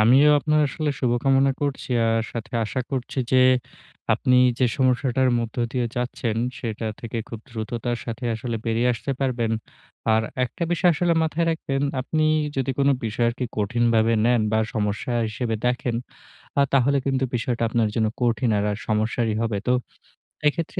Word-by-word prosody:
আমিও 130 +7 +6
আপনার 150 +1 +2
আসলে 155 +1 -2
শুভকামনা 135 +2 +3
করছি। 140 -2 -2 0.2
আর 115 0 +2
সাথে 115 -2 -6
আশা 120 +4 -2
করছি 135 0 -3
যে - - +6 0.8
আপনি 125 - +2 0.2
যে 130 - +3
সমস্যাটার 130 0 +2
মধ্য 115 -1 -4 0.2
দিয়ে 125 -2 0
যাচ্ছেন 120 -2 -2 0.2
সেটা 110 -1 -4
থেকে 115 0 -4
খুব 115 - -7
দ্রুততার 120 +1 -3
সাথে 115 +1 -5
আসলে 115 +1 -3
বেরিয়ে 115 +2 +2
আসতে 130 +4 -3
পারবেন। 125 -4 0 0.6
আর 110 - +3 0.2
একটা 125 +8 -7
বিষয় 175 +1 +4
আসলে 170 +2 +1
মাথায় 165 +1 0
রাখবেন, 140 -4 -2 0.2
আপনি 155 +4 -1 0.3
যদি 135 0 0
কোনো 140 0 +4
বিষয়কে 120 +3 0
কঠিনভাবে 115 +1 +2
নেন 120 -1 +3
বা 110 - +3 0.2
সমস্যা 105 +3 -1 0.2
হিসেবে 115 +1 -2
দেখেন 125 -1 0 0.6
আ - - +6
তাহলে 140 +1 +3
কিন্তু 135 -1 +1
বিষয়টা 120 0 -1
আপনার 110 -1 +1
জন্য 110 -1 +2 0.2
কঠিন 120 0 +2
আর 100 - 0 0.2
সমস্যারই 110 +1 0
হবে। 110 -3 -1
তো 125 - +4 0.8
এক্ষেত্রে 165 +2 -1
120 Hz, 155 wpm, -24 LUFS, 115-135 Hz, 0.8 s, আমিও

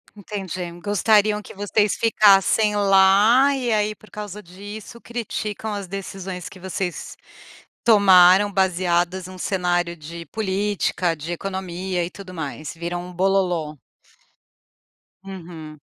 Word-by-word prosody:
Entendi, 190 -4 -6
gostariam 210 +2 +2
que - - -13
vocês 205 +1 +1
ficassem 210 -1 +4
lá 205 +7 +5
e 245 -3 -2
aí 210 0 0
por 215 -3 -20
causa 210 0 -7
disso, 205 +6 -10
criticam 220 -2 -4
as 200 -2 -5
decisões 190 -1 -6
que 185 - -12
vocês 185 -1 -5 0.7
tomaram 195 -2 +6
baseadas 185 -1 0
num 185 - -10
cenário 175 -2 -1
de 170 +1 -9
política, 195 -4 -1
de 160 +2 -6
economia 185 0 -3
e - - -8
tudo 195 -2 -11
mais, 155 -2 -6
viram 175 +1 -5
um 180 - -10
"bololô". 180 -4 0 1.5
Uhum. 165 -5 -9
190 Hz, 115 wpm, -22 LUFS, 175-205 Hz, 1.5 s, tomaram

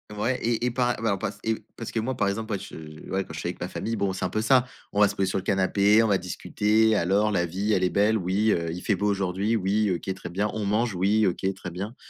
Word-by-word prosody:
ouais 120 +5 -1
et 120 +1 0
et - - +2
par 125 -1 0
ouais, 115 - +1
on 100 - 0
passe - - -4
et 110 -1 -1
parce 115 - -6
que 115 - -1
moi, 130 +4 -2
par 100 - +1
exemple, 110 +3 -3
moi, 100 - 0
je 80 -5 -10
ouais, 95 0 0
quand 80 - -11
je 80 - -5
suis - - -3
avec 90 - -7
ma 90 - -2
famille, 115 +4 -3
bon, 100 -3 0
c'est 95 - -3
un - - -1
peu 110 - -1
ça. 125 +2 +4 0.3
On 100 - 0
va 105 - +7
se 100 - -5
poser 95 -1 0
sur 95 - -1
le 95 - -3
canapé, 100 +2 +3
on - - +2
va 100 -2 +3
discuter: 105 +4 +1
«Alors 100 +3 +2
la 90 -4 +1
vie 95 +6 -1
elle 95 - +2
est 90 - +3
belle?» 105 +3 +2
«Oui», 105 +4 +2
heu: 85 -4 0
«Il 90 +2 -6
fait 105 - +1
beau 100 +3 -1
aujourd'hui?» 100 +2 0
«Oui», 100 +1 +1
«OK, 95 +2 -4
très 95 - -8
bien», 100 +4 -1
«On 110 -2 -3
mange?» 105 +1 0
«Oui», 100 +4 +2
«OK, 95 +2 -1
très 90 - -7
bien», 100 +7 -5
100 Hz, 295 wpm, -26 LUFS, 95-110 Hz, 0.3 s, va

